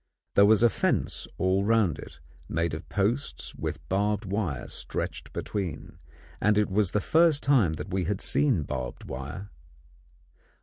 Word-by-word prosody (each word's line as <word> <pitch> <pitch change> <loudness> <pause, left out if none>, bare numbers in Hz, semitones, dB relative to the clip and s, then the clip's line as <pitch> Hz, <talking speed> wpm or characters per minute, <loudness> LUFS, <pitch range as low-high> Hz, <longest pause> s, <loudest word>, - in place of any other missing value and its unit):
There 100 - +6
was 110 +1 +5
a 120 - +7
fence - - 0
all 95 +1 +2
round 110 -6 +2
it, 70 - -11 0.3
made 85 +2 0
of 80 - -6
posts 105 +7 -1
with - - -5
barbed 105 +2 0
wire 95 - -2
stretched - - -4
between, 95 -7 -4 0.4
and 105 +1 +3
it 105 -1 +2
was 100 -1 +2
the 105 - +1
first 160 - +3
time 125 - +4
that 95 +4 -6
we 95 -2 0
had 100 +1 -1
seen 130 - +2
barbed 65 -2 -5
wire. 70 +11 -7
100 Hz, 150 wpm, -27 LUFS, 85-110 Hz, 0.4 s, a